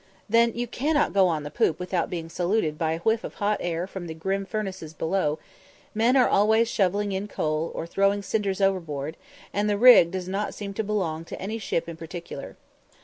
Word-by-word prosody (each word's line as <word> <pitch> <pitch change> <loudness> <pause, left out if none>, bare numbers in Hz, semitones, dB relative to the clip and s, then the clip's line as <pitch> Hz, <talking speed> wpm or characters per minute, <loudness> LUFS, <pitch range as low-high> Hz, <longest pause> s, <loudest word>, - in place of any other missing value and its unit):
Then 230 +1 +4
you 240 +1 -1
cannot 290 +5 0
go 195 -2 +5
on 160 -4 -1
the 145 - -7
poop 155 - +1
without 180 -1 -1
being 165 -2 -4
saluted 175 -1 0
by 160 0 0
a 165 - -3
whiff 220 +4 +1
of - - -7
hot 210 0 0
air 170 0 -2
from 190 -2 -7
the 160 - -6
grim 195 +4 -2
furnaces 190 -7 -5
below; 160 -2 0 0.6
men 230 +4 +3
are 255 - +5
always 220 +3 +4
shovelling 200 -1 +1
in 195 +2 -3
coal, 155 -3 -2
or - - -3
throwing 195 +3 +1
cinders 200 -1 -1
overboard; 160 -6 -1 0.4
and 205 +1 +1
the 205 - +1
rig 240 -7 +8
does 185 0 -4
not 195 +3 -2
seem 200 -1 -6
to 220 - -2
belong 185 -7 -2
to - - -8
any 215 +4 -4
ship 170 -5 -2
in 165 -1 -7
particular. 170 +1 -8
195 Hz, 205 wpm, -26 LUFS, 165-210 Hz, 0.6 s, rig